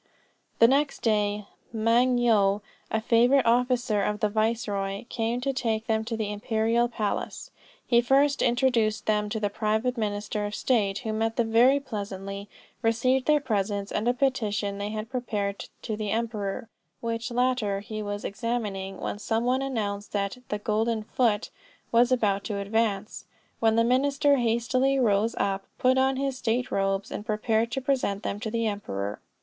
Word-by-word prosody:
The 230 Hz, -, +7 dB
next 280 Hz, +3 st, +1 dB
day, 210 Hz, -2 st, +1 dB, 0.3 s
Moung 235 Hz, +3 st, +3 dB
Yo, 210 Hz, -4 st, +3 dB, 0.3 s
a 220 Hz, -, 0 dB
favorite 245 Hz, +4 st, +4 dB
officer 245 Hz, -2 st, +2 dB
of 210 Hz, +1 st, -1 dB
the 210 Hz, -, +1 dB
viceroy, 205 Hz, -2 st, -1 dB
came 230 Hz, +1 st, -1 dB
to 275 Hz, +1 st, -1 dB
take 225 Hz, -3 st, -1 dB
them 220 Hz, -1 st, 0 dB
to 225 Hz, 0 st, -3 dB
the 210 Hz, -2 st, -2 dB
imperial 225 Hz, +3 st, +1 dB
palace. 220 Hz, -3 st, -3 dB, 0.3 s
He 235 Hz, -1 st, +4 dB
first 275 Hz, +3 st, +3 dB
introduced 235 Hz, -3 st, +2 dB
them 210 Hz, -1 st, +1 dB
to 220 Hz, -, -2 dB
the 205 Hz, -1 st, -1 dB
private 220 Hz, +4 st, 0 dB
minister 210 Hz, 0 st, -2 dB
of 205 Hz, -, -5 dB
state, 205 Hz, -6 st, +1 dB
who 220 Hz, -, -1 dB
met 225 Hz, +1 st, -1 dB
them 230 Hz, -2 st, 0 dB
very 250 Hz, +5 st, +5 dB
pleasantly, 200 Hz, -5 st, -6 dB, 0.3 s
received 250 Hz, +3 st, +2 dB
their 300 Hz, -1 st, +5 dB
presents, 205 Hz, -5 st, -2 dB
and 215 Hz, +3 st, -1 dB
a 245 Hz, -, +4 dB
petition 210 Hz, -7 st, 0 dB
they 205 Hz, +1 st, -3 dB
had 215 Hz, +1 st, -4 dB
prepared 210 Hz, -6 st, -2 dB, 0.2 s
to 220 Hz, -, -2 dB
the 210 Hz, -1 st, -3 dB
emperor, 220 Hz, -2 st, -2 dB, 0.3 s
which 230 Hz, +1 st, -3 dB
latter 240 Hz, -5 st, 0 dB
he 215 Hz, +1 st, -6 dB
was 205 Hz, 0 st, -4 dB
examining 200 Hz, -4 st, -3 dB
when 205 Hz, -, -4 dB
some 225 Hz, +1 st, -1 dB
one 255 Hz, +2 st, +1 dB
announced 210 Hz, -6 st, -3 dB
that 200 Hz, +3 st, -2 dB
the 210 Hz, -, -1 dB
'golden 220 Hz, +1 st, 0 dB
foot' 220 Hz, -1 st, 0 dB, 0.4 s
was 240 Hz, +2 st, +4 dB
about 205 Hz, -5 st, +2 dB
to 210 Hz, -, -3 dB
advance; 210 Hz, 0 st, -1 dB, 0.3 s
when 225 Hz, -1 st, +3 dB
the 230 Hz, -, +4 dB
minister 280 Hz, +3 st, +3 dB
hastily 250 Hz, +3 st, +1 dB
rose 225 Hz, -2 st, +2 dB
up, 195 Hz, 0 st, -1 dB
put 260 Hz, +1 st, +3 dB
on 265 Hz, 0 st, +2 dB
his 270 Hz, -1 st, -2 dB
state 245 Hz, +2 st, -1 dB
robes, 195 Hz, 0 st, 0 dB
and -, -, -4 dB
prepared 220 Hz, +1 st, 0 dB
to 270 Hz, -, -1 dB
present 250 Hz, -7 st, -1 dB
them 200 Hz, -, -3 dB
to 220 Hz, 0 st, -3 dB
the 230 Hz, +1 st, -1 dB
emperor. 105 Hz, -, -3 dB
225 Hz, 165 wpm, -27 LUFS, 205-245 Hz, 0.4 s, The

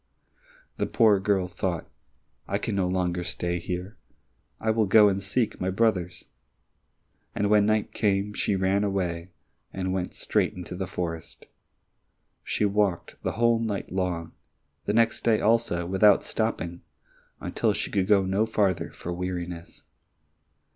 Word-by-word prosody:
The -, -, 0 dB
poor 110 Hz, -4 st, +4 dB
girl 95 Hz, -2 st, +1 dB
thought, 90 Hz, -1 st, -3 dB, 0.6 s
"I -, -, 0 dB
can -, -, -3 dB
no 95 Hz, -2 st, +1 dB
longer 90 Hz, -1 st, -1 dB
stay 85 Hz, 0 st, -2 dB
here. 90 Hz, +5 st, -5 dB, 0.6 s
I 110 Hz, -, +1 dB
will 110 Hz, -1 st, +2 dB
go 105 Hz, +1 st, +7 dB
and 100 Hz, 0 st, -1 dB
seek 110 Hz, +4 st, -1 dB
my 95 Hz, -, 0 dB
brothers." 95 Hz, -4 st, 0 dB, 1.1 s
And 105 Hz, 0 st, +1 dB
when 105 Hz, -1 st, +5 dB
night 110 Hz, -1 st, +1 dB
came, 100 Hz, -1 st, +1 dB
she 105 Hz, -, 0 dB
ran 95 Hz, +2 st, +1 dB
away, 90 Hz, -3 st, -2 dB, 0.4 s
and 95 Hz, -1 st, -2 dB
went 90 Hz, -1 st, -3 dB
straight -, -, 0 dB
into 90 Hz, 0 st, -7 dB
the 95 Hz, 0 st, -3 dB
forest. 85 Hz, -2 st, -5 dB, 1.0 s
She 105 Hz, -, 0 dB
walked 100 Hz, -3 st, 0 dB
the -, -, -2 dB
whole 115 Hz, +1 st, +3 dB
night 105 Hz, -4 st, -3 dB
long, 90 Hz, -3 st, -2 dB, 0.6 s
and 105 Hz, -, +1 dB
next 115 Hz, -1 st, +3 dB
day 115 Hz, -2 st, +3 dB
also 110 Hz, -6 st, +2 dB
without 95 Hz, +3 st, +4 dB
stopping, 85 Hz, +1 st, -2 dB, 0.6 s
until -, -, 0 dB
she -, -, -2 dB
could 95 Hz, -2 st, +1 dB
go 100 Hz, -2 st, +4 dB
no 100 Hz, +4 st, +1 dB
farther 100 Hz, -5 st, +1 dB
for 90 Hz, -, -6 dB
weariness. 90 Hz, -1 st, -5 dB
95 Hz, 145 wpm, -26 LUFS, 90-105 Hz, 1.1 s, go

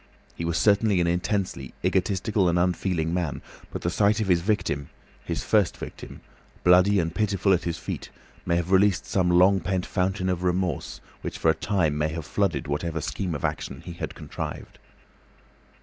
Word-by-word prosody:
He 85 Hz, -, -5 dB
was 85 Hz, 0 st, 0 dB
certainly 105 Hz, -2 st, +3 dB
an 85 Hz, -, +2 dB
intensely 90 Hz, -, -1 dB
egotistical 95 Hz, +1 st, +1 dB
and 85 Hz, -, +1 dB
unfeeling 90 Hz, -2 st, 0 dB
man, 85 Hz, -6 st, -2 dB, 0.3 s
but -, -, -6 dB
the 85 Hz, -, 0 dB
sight 105 Hz, +3 st, +3 dB
of 105 Hz, -3 st, -1 dB
his 85 Hz, -2 st, +4 dB
victim, 85 Hz, -8 st, -1 dB, 0.3 s
his 85 Hz, -, -3 dB
first 105 Hz, -5 st, +2 dB
victim, -, -, -9 dB, 0.4 s
bloody 90 Hz, +3 st, +5 dB
and 85 Hz, -1 st, -1 dB
pitiful 100 Hz, -1 st, +2 dB
at 90 Hz, -, 0 dB
his 85 Hz, -2 st, -2 dB
feet, -, -, -6 dB, 0.3 s
may 85 Hz, -, 0 dB
have 85 Hz, +1 st, -1 dB
released 95 Hz, -1 st, +4 dB
some 90 Hz, -2 st, +1 dB
long 90 Hz, +3 st, +5 dB
pent 95 Hz, +1 st, -1 dB
fountain 95 Hz, 0 st, -1 dB
of 90 Hz, -2 st, -1 dB
remorse 90 Hz, -3 st, -1 dB, 0.2 s
which -, -, -5 dB
for -, -, +3 dB
a -, -, +1 dB
time 80 Hz, -8 st, 0 dB
may 75 Hz, -, +2 dB
have 80 Hz, 0 st, -5 dB
flooded -, -, 0 dB
whatever 80 Hz, +3 st, -2 dB
scheme 90 Hz, +2 st, -3 dB
of 70 Hz, -, -3 dB
action -, -, -3 dB
he 85 Hz, -, -6 dB
had 85 Hz, -, -6 dB
contrived. -, -, -7 dB
90 Hz, 180 wpm, -26 LUFS, 85-100 Hz, 0.4 s, bloody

